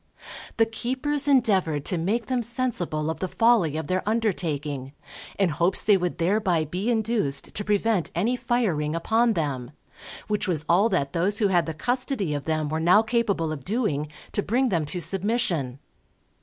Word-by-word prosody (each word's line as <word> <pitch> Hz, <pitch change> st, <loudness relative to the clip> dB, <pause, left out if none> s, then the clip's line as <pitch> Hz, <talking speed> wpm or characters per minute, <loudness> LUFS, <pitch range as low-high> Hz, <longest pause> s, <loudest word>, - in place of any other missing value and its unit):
The 225 Hz, -, +5 dB
keepers 260 Hz, +6 st, -2 dB
endeavoured 195 Hz, -, +2 dB
to 180 Hz, -, +1 dB
make 210 Hz, +7 st, -1 dB
them 250 Hz, +2 st, -1 dB
sensible 210 Hz, -10 st, -1 dB
of 160 Hz, -, -7 dB
the 185 Hz, -, -2 dB
folly 210 Hz, -8 st, +2 dB
of 160 Hz, -, -3 dB
their 185 Hz, 0 st, 0 dB
undertaking, 150 Hz, -, -2 dB, 0.4 s
in 195 Hz, -3 st, +2 dB
hopes 170 Hz, +5 st, +1 dB
they 205 Hz, -, +5 dB
would 180 Hz, -2 st, -1 dB
thereby 180 Hz, -2 st, +1 dB
be 185 Hz, +9 st, -3 dB
induced 220 Hz, -, 0 dB
to 205 Hz, -, -2 dB
prevent 210 Hz, -2 st, +1 dB
any 220 Hz, +9 st, +1 dB
firing 180 Hz, -12 st, 0 dB
upon 225 Hz, +7 st, +2 dB
them; 140 Hz, -, -2 dB, 0.6 s
which 210 Hz, -1 st, -1 dB
was 160 Hz, -4 st, +1 dB
all 190 Hz, +7 st, +4 dB
that 140 Hz, -9 st, -1 dB
those 185 Hz, +4 st, 0 dB
who 210 Hz, -3 st, +2 dB
had 175 Hz, -3 st, +2 dB
the 160 Hz, -, -4 dB
custody 245 Hz, -, -1 dB
of 145 Hz, -2 st, -4 dB
them 155 Hz, -1 st, -1 dB
were 155 Hz, +2 st, -2 dB
now 180 Hz, +7 st, +5 dB
capable 220 Hz, -8 st, 0 dB
of 145 Hz, -4 st, -6 dB
doing, 190 Hz, -, -1 dB, 0.2 s
to -, -, 0 dB
bring 250 Hz, +5 st, +1 dB
them 170 Hz, -6 st, 0 dB
to 180 Hz, +5 st, -4 dB
submission. 185 Hz, -, -1 dB
190 Hz, 170 wpm, -25 LUFS, 160-225 Hz, 0.6 s, The